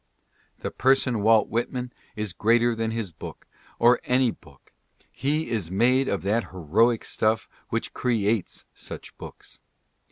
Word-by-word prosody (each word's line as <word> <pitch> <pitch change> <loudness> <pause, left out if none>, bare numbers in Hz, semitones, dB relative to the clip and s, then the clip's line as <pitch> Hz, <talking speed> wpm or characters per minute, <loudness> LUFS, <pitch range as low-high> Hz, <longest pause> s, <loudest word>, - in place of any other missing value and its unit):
The - - -5
person 130 -3 +2
Walt 110 0 +5
Whitman 125 +2 -3 0.2
is 105 -4 -3
greater 115 +4 +3
than 115 0 -2
his 110 -5 -3
book, 80 - -10 0.3
or 120 +1 +5
any 125 -1 +2
book. 70 -9 -19 0.4
He 150 +4 -1
is 105 -8 -1
made 125 +8 +3
of 100 - -1
that 110 +4 +1
heroic 105 +7 +2
stuff 110 +1 0 0.2
which - - -2
creates 110 -5 0
such - - -9
books. - - -11
115 Hz, 135 wpm, -25 LUFS, 105-125 Hz, 0.4 s, Walt